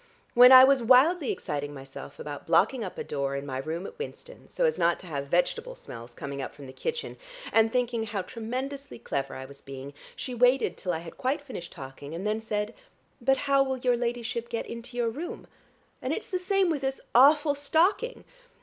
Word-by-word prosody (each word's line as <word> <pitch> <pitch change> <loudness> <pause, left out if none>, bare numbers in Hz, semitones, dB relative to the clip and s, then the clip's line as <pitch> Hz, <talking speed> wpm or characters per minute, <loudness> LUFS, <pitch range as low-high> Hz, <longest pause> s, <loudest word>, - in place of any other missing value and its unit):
When 250 +1 +9
I 260 0 +11
was 270 -1 +5
wildly 265 +7 +5
exciting 145 0 -4
myself 135 0 -10
about 145 -1 -7
blocking 220 +9 +3
up 185 - -6
a - - -3
door 140 -1 -2
in 140 0 -4
my 130 -2 -4
room 160 +6 -4
at - - -10
Winston, - - -9
so - - 0
as 470 - +1
not 170 0 +3
to - - -13
have 140 -5 -4
vegetable 180 - 0
smells 120 - -11
coming 140 -1 -5
up - - -6
from 145 - -11
the 130 - -10
kitchen, 475 - -4 0.4
and 225 0 +4
thinking 240 -2 0
how 205 -3 -3
tremendously 260 +7 -5
clever 140 -1 -3
I 130 - -6
was 140 +1 -14
being, 135 +1 -8 0.2
she 255 - -5
waited 250 +2 +3
till 180 - -3
I 165 - -1
had 165 - -11
quite 265 +3 0
finished 175 -11 -7
talking, 140 +1 -9
and 180 +4 -5
then 215 +1 0
said, 215 0 -3 0.5
'But 270 +2 +3
how 275 -1 +4
will 265 -1 0
your 245 -1 +2
ladyship 235 0 -3
get 230 - -3
into 235 +1 -8
your 235 -2 +1
room?' 315 +9 -6 0.6
And - - -2
it's - - -5
the 370 - 0
same 380 -1 +2
with 295 -4 -1
this 270 0 -2
awful 290 +4 +6
stocking." 340 - +1
235 Hz, 205 wpm, -28 LUFS, -, 0.6 s, I